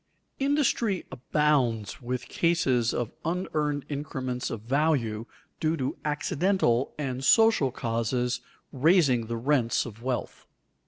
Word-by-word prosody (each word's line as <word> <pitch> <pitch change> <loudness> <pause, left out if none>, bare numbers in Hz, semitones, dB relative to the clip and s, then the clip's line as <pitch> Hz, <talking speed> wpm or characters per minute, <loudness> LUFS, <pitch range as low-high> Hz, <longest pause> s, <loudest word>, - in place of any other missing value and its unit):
_Industry 270 - +1
abounds 130 - 0
with 125 +1 -4
cases 135 -9 +2
of 120 -2 -2
unearned 155 -4 -1
increments 130 -4 -3
of 115 - -5
value 120 -4 0 0.3
due 160 +1 +1
to 130 -2 -2
accidental 150 -3 +1
and 130 -3 -3
social 225 - +5
causes 120 +1 -1 0.3
raising 140 -5 +3
the 115 0 -3
rents 125 -1 +1
of 115 -2 -10
wealth. 125 0 -4
135 Hz, 110 wpm, -27 LUFS, 120-155 Hz, 0.3 s, social